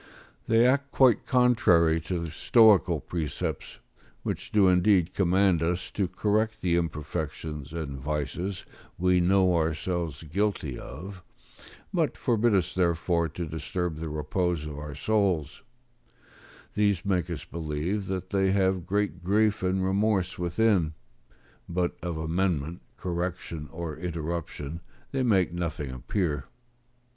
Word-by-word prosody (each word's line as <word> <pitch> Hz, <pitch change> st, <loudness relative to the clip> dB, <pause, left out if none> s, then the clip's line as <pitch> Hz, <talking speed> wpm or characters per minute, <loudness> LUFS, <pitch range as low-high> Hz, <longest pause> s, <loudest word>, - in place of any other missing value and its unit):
They 115 Hz, +1 st, +5 dB
act 140 Hz, +2 st, +2 dB
quite 130 Hz, -5 st, +4 dB
contrary 90 Hz, -10 st, +4 dB
to 90 Hz, +3 st, -3 dB
the 85 Hz, -2 st, -4 dB
stoical 100 Hz, -3 st, +5 dB
precepts, 80 Hz, -4 st, -4 dB, 0.5 s
who -, -, 0 dB
do 100 Hz, -3 st, +2 dB
indeed 90 Hz, -1 st, +4 dB
command 95 Hz, -2 st, +3 dB
us 85 Hz, +2 st, -1 dB
to 100 Hz, -3 st, 0 dB
correct 110 Hz, +4 st, 0 dB
the 85 Hz, -2 st, +2 dB
imperfections 80 Hz, -2 st, -3 dB
and 75 Hz, -5 st, -5 dB
vices 75 Hz, +7 st, -3 dB, 0.3 s
we 90 Hz, 0 st, +3 dB
know 95 Hz, 0 st, +4 dB
ourselves 80 Hz, -1 st, -1 dB
guilty 80 Hz, -4 st, -1 dB
of, 90 Hz, +7 st, -9 dB, 0.7 s
but -, -, 0 dB
forbid 115 Hz, -2 st, +2 dB
us 90 Hz, -5 st, +1 dB
therefore 85 Hz, -1 st, +1 dB
to 85 Hz, +3 st, -5 dB
disturb 80 Hz, +1 st, -3 dB
the 80 Hz, 0 st, -4 dB
repose 75 Hz, +2 st, -1 dB
of 75 Hz, -1 st, -6 dB
our 75 Hz, -1 st, -7 dB
souls: 95 Hz, -4 st, 0 dB, 1.1 s
these 100 Hz, -2 st, +1 dB
make 90 Hz, -3 st, 0 dB
us 80 Hz, -6 st, -5 dB
believe 85 Hz, +5 st, -3 dB
that 95 Hz, -1 st, -4 dB
they 95 Hz, -1 st, +2 dB
have 95 Hz, -2 st, +1 dB
great 100 Hz, -3 st, -1 dB
grief 105 Hz, +3 st, +2 dB
and 95 Hz, 0 st, +1 dB
remorse 95 Hz, -2 st, +1 dB
within: 90 Hz, -2 st, +2 dB, 0.7 s
but 90 Hz, 0 st, 0 dB
of 85 Hz, -2 st, -3 dB
amendment, 80 Hz, -1 st, -1 dB, 0.2 s
correction, 85 Hz, -3 st, -4 dB
or 80 Hz, -2 st, -5 dB
interruption, 80 Hz, -2 st, -4 dB, 0.3 s
they 135 Hz, -, 0 dB
make 95 Hz, -9 st, +2 dB
nothing 80 Hz, -6 st, -3 dB
appear. 75 Hz, -, -2 dB
90 Hz, 125 wpm, -27 LUFS, 80-95 Hz, 1.1 s, They